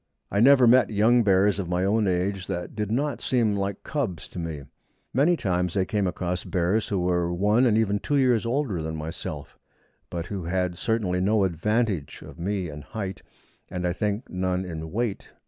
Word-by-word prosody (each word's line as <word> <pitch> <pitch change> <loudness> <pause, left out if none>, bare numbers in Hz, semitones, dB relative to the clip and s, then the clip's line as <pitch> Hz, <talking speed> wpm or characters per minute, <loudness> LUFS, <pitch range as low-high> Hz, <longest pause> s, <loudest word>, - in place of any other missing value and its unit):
I 100 - +1
never 130 +2 +7
met 125 +2 +5
young 110 +3 +4
bears 100 -1 +3
of 90 -3 -3
my 90 +1 +1
own 105 +1 +2
age 95 +1 -1
that 85 -1 -4
did 105 -2 -2
not 140 +5 -1
seem 115 -5 +1
like 100 0 -3
cubs 115 - -3
to - - -7
me. 80 -4 -5 0.5
Many 155 +7 +3
times 90 - -1
I 95 - +2
came 100 -1 0
across 90 0 -2
bears 95 +5 0
who 100 - -1
were 90 -1 +1
one 105 +8 +3
and 110 -2 +3
even 105 -2 +1
two 145 - -1
years 125 -5 +3
older 115 - -1
than 80 0 -4
myself, 80 +1 -6 0.5
but 85 -1 -4
who 95 -2 -5
had 90 0 -1
certainly 95 -3 0
no 105 +2 +3
advantage 95 - -1
of - - -12
me 95 +1 -2
in 75 -1 -8
height, 95 +4 -6 0.5
and, 90 -1 -3
I 90 - +1
think, 105 +6 -2
none 90 0 -1
in 80 -2 -6
weight. 115 -1 -3
100 Hz, 190 wpm, -25 LUFS, 90-110 Hz, 0.5 s, never